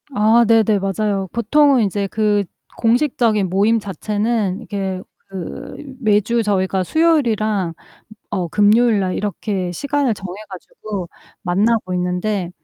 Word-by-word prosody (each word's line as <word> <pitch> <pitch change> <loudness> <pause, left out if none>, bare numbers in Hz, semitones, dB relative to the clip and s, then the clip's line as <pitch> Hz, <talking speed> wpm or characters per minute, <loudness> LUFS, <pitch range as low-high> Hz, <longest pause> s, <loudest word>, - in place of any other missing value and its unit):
아 220 +3 +5
네네 220 -2 +4
맞아요. 195 0 -1
보통은 270 +3 +3
인제 200 0 -1
그 210 -1 +1 0.3
공식적인 230 -5 +2
모임 210 +5 +2
자체는 205 +1 -2
이게 195 -4 -4 0.3
그 190 -4 -7 0.2
매주 215 0 +2
저희가 190 -3 0
수요일이랑 220 - +1 0.6
어 185 -4 -1
금요일날 210 0 +3
이렇게 195 -2 -3
시간을 280 +3 0
정해 185 -2 -7
가지고 190 0 -7 0.4
만나고 195 +1 +1
있는데 180 +1 -1
210 Hz, 265 characters per minute, -19 LUFS, 190-230 Hz, 0.6 s, 아